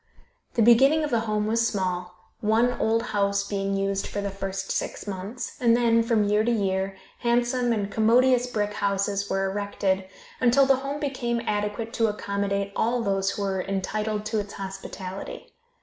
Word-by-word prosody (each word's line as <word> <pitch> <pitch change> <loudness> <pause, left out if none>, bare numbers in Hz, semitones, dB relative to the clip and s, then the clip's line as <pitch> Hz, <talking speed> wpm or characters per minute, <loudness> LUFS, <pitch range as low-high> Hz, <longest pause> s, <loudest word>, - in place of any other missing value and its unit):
The 230 - +4
beginning 270 +7 +6
of 295 - -2
the 235 - +3
home 210 0 +1
was 230 +2 +2
small, 180 -3 -2 0.2
one 225 +3 +3
old 225 +1 +2
house 200 0 +1
being 195 -1 -1
used 195 0 -1
for 205 - -4
the 200 -1 -2
first 195 0 -4
six - - -3
months, 200 +4 -5
and 235 -1 +5
then, 230 -1 +4
from 230 -2 +2
year 210 +1 +2
to 235 - +1
year, 195 -3 0 0.2
handsome 240 +1 +1
and 205 -3 -1
commodious 245 +3 +4
brick 210 -4 -1
houses 200 0 -1
were 195 0 0
erected, 195 -1 -1 0.3
until 255 +2 +5
the 270 -1 +4
home 275 +2 -4
became 260 -5 -1
adequate 210 +2 -2
to 225 -3 +2
accommodate 200 -1 -2
all 235 +1 +1
those 195 -2 +1
who 205 - -3
were 190 -1 -1
entitled 210 +3 -2
to 220 0 0
its 205 0 -5
hospitality. 195 -1 -7
210 Hz, 170 wpm, -26 LUFS, 195-235 Hz, 0.3 s, beginning